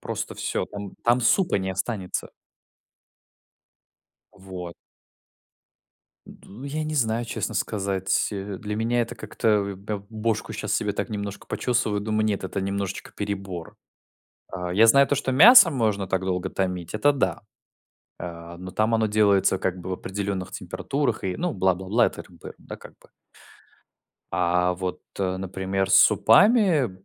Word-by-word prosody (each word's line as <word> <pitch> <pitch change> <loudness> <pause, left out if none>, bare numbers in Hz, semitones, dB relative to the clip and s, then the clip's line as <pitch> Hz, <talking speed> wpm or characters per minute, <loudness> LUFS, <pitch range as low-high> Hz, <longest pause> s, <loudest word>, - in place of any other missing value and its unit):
просто - - -5
всё. - - -2
Там 100 -1 -7
там 120 +1 +4
супа 150 - +3
не 95 0 -3
останется. 95 -1 -3 2.0
Вот. 90 -2 -9 1.5
Ду, 110 +7 -13
я 155 +2 -3
не 155 - -4
знаю, 115 -4 0
честно 110 -1 -3
сказать. 95 -2 -1
Э, 100 -1 -5
для 105 0 -4
меня 120 +2 +1
это 115 - -6
как-то, - - -3
э, 105 -2 +2
эм, - - -10
б 100 +1 -5
бошку 110 0 -2
щас - - -3
себе - - 0
так - - -4
немножко 100 -1 -5
почесываю, 110 -4 0
думаю: 110 +1 0
"Нет, 105 -3 -1
это 95 +1 -3
немножечко 100 0 -4
перебор". 95 -4 -5 0.8
А, 90 -1 -4
я 110 +4 +6
знаю 140 +4 +6
то, - - +1
что 135 -1 -1
мясо 185 - +9
можно 110 -8 0
так 95 0 0
долго 95 0 -2
томить, 90 -3 -3
это 105 +7 +3
да. 95 - -1 0.8
Э, 85 0 -8
но 90 +1 -8
там 110 +3 +1
оно 110 -1 +2
делается 100 -3 +3
как 95 -1 -1
бы 90 - -7
в - - 0
определенных 95 0 -4
температурах 100 - -3
и, 95 -1 -2
ну, 175 -1 -1
бла-бла-бла, 95 +4 +2
это - - -6
р - - -19
бы, - - -11
да, - - -9
как - - -14
бы. - - -22 1.2
А, 90 +1 +2
вот, 90 0 -4 0.2
э, 95 -1 -1
например, 95 +1 -2
с - - +5
супами. 160 - +5
100 Hz, 155 wpm, -24 LUFS, 95-115 Hz, 2.0 s, мясо